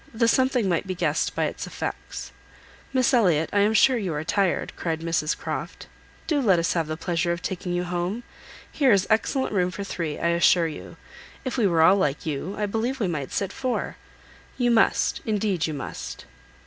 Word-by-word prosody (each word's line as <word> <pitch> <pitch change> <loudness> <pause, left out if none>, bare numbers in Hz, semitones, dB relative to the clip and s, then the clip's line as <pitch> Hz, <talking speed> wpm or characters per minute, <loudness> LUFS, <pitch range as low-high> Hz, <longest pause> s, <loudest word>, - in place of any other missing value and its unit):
The 230 0 +3
something 255 -2 +2
might 175 +1 0
be 185 - -3
guessed 165 -3 0
by - - +1
its - - -4
effects. - - -6 0.6
"Miss 260 -1 +2
Elliot, 175 -10 +3
I 205 - +3
am 210 +2 +3
sure 255 +3 +5
you 185 -7 -2
are 150 - -2
tired," 190 +2 0
cried 160 -2 -3
Mrs 165 -2 0
Croft. - - -5 0.4
"Do 295 -3 +1
let 195 -8 +4
us 170 0 +1
have 165 -3 0
the 155 0 -4
pleasure 170 0 -1
of 170 0 -3
taking 185 -1 -3
you 175 0 0
home. 180 +6 -3 0.5
Here 275 -4 +3
is 200 -2 +4
excellent 245 +3 +1
room 180 -2 +2
for 190 +3 -5
three, 165 -6 -4
I 170 - 0
assure 170 0 +4
you. 155 - -9 0.5
If 255 - -2
we 230 -5 +3
were 165 -3 +3
all 190 +4 +6
like 150 -7 0
you, 160 +6 -3
I 210 - 0
believe 225 +6 -2
we 210 - +1
might 150 -6 -3
sit 195 - -2
four. 255 -2 -2 0.6
You 245 -2 +2
must, 225 -1 +2
indeed, 205 -6 0
you 155 - -4
must." 135 - -7
185 Hz, 200 wpm, -25 LUFS, 165-220 Hz, 0.6 s, all